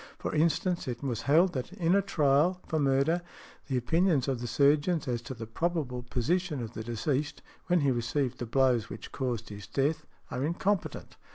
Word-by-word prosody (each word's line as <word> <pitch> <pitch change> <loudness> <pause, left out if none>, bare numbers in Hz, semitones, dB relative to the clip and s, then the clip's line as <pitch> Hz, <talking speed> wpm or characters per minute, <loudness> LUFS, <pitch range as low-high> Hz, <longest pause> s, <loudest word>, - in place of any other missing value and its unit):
For - - -4
instance, 170 +3 +1
it 120 0 -4
was 120 -5 -2
held 175 +5 +5
that 130 +4 -4
in 175 -3 +1
a 200 - +5
trial 155 +1 +2
for 160 - 0
murder 140 +5 +2 0.5
the 130 - 0
opinions 160 +2 +2
of 130 -3 -1
the 120 - -3
surgeons 145 +6 +2
as 120 -2 -1
to 125 +2 -7
the 115 -1 -6
probable 140 0 -2
position 150 +6 -1
of 115 0 -7
the 110 - -5
deceased, 130 +6 -2 0.2
when 180 -2 +3
he 140 -1 +3
received 125 +2 -1
the 120 - -4
blows 125 -2 +2
which - - -8
caused 120 -4 -3
his 100 -1 -9
death, 150 +7 0 0.2
are 125 - -2
incompetent. 180 +5 -1
140 Hz, 185 wpm, -29 LUFS, 120-165 Hz, 0.5 s, held